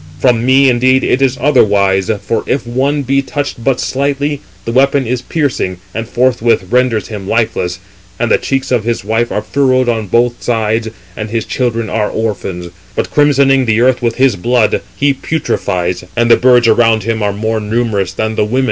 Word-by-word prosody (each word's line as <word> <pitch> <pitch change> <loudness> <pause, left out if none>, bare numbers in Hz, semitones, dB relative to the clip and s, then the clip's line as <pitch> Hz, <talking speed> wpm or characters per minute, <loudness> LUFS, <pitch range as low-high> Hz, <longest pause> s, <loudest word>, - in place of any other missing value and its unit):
From 115 +6 +2
me, 135 +2 +4
indeed, 130 +1 +3
it 130 - +1
is 135 -1 +1
otherwise; 100 -8 +2
for 115 - -1
if 135 - -1
one 135 +4 -1
be 135 +1 +1
touched 140 -3 -4
but 130 0 +1
slightly, 140 +1 -1 0.2
the 115 - -2
weapon 135 +2 +2
is 120 +1 -2
piercing, 125 - -2 0.2
and 115 0 -4
forthwith 120 -5 +1
renders 125 -4 +1
him 105 -3 -7
lifeless; 100 -6 -1 0.4
and 120 -1 -1
the - - +4
cheeks 135 -1 -2
of 120 -4 +1
his 115 -2 -2
wife 115 +2 0
are 105 - -2
furrowed 130 -2 +1
on 110 -3 -1
both 120 +4 +1
sides, 110 -1 -1 0.3
and 110 0 -5
his 115 0 -2
children 115 -3 -2
are 105 -1 -1
orphans; 95 -5 -4 0.2
but - - -2
crimsoning 140 -2 +3
the 110 0 +2
earth 125 +1 +2
with 115 -1 -1
his 130 -4 +2
blood, 115 +3 +1
he 140 +7 +2
putrefies, 90 - -2
and 120 0 +2
the - - +9
birds 125 -2 +4
around 115 -1 +3
him 115 +1 -2
are 105 -1 0
more 110 +2 -2
numerous 105 -3 -1
than 110 +3 -2
the 110 - 0
women." 115 +5 -1
120 Hz, 185 wpm, -13 LUFS, 110-130 Hz, 0.4 s, the